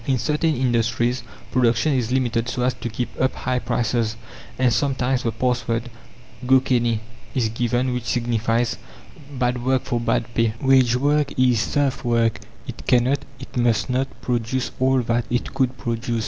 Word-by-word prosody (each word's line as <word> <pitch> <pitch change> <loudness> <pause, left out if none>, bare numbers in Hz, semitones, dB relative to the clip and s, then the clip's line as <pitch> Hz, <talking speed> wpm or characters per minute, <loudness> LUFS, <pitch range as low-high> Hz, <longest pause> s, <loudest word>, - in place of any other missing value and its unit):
In 135 -2 +2
certain 150 +5 +1
industries 120 0 +1 0.3
production 125 +4 +2
is 125 -3 0
limited 120 -2 0
so 125 - -2
as 125 0 +2
to 120 - -5
keep 120 +2 -3
up 130 - +1
high 125 -1 -1
prices, 115 -2 0 0.4
and 125 -2 +3
sometimes 130 +1 +1
the 115 - -1
pass 120 +2 -1
word, 115 +1 -2 0.6
"Go 130 0 +6
canny," 120 -4 +1 0.3
is 120 -4 +1
given, 120 +2 0
which 125 -1 -3
signifies, 115 -1 0 0.6
"Bad 125 -1 0
work 130 0 +1
for 120 - -1
bad 115 0 -1
pay!" 115 -2 +1
Wage 130 -3 +4
work 145 +2 +2
is 125 -3 +4
serf 140 0 0
work; 115 -2 +1 0.3
it - - -9
cannot, 125 +3 +3 0.2
it 130 - -11
must 120 0 +1
not, 130 +1 +1 0.2
produce 120 +1 -1
all 130 -1 +3
that 115 0 0
it 120 0 -2
could 130 -1 0
produce. 115 0 -2
125 Hz, 165 wpm, -22 LUFS, 115-130 Hz, 0.6 s, Go